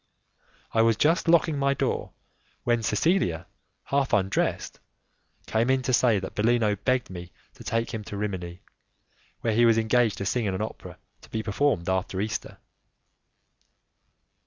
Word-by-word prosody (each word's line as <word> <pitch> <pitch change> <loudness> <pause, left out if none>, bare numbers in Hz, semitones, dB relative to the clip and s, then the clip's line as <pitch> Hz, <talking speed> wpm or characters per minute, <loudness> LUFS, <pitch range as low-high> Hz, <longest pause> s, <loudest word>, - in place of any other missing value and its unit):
I 110 - +4
was 115 -1 +3
just 165 +3 +2
locking 165 -3 +3
my 140 0 +2
door - - -2 0.5
when 120 -1 +1
Cecilia, 105 - +1 0.4
half 140 -1 0
undressed, 95 -2 0 0.7
came 115 +3 0
in 130 0 +2
to 130 - -1
say 120 -2 +4
that 95 -1 -5
Bellino 110 -1 +2
begged 125 +2 -1
me 90 -1 -8 0.2
to - - -13
take 115 +1 -2
him 110 -2 -4
to 100 - -6
Rimini, 90 -4 -4 0.8
where 115 - 0
he 120 +2 +4
was 115 -1 +5
engaged 115 0 +2
to 100 - -4
sing 120 +3 0
in 95 -2 -1
an 95 - -3
opera 110 - -8 0.2
to - - -16
be 110 - -3
performed 105 -4 0
after 95 0 -1
Easter. 110 +3 -4
110 Hz, 155 wpm, -26 LUFS, 100-125 Hz, 0.8 s, was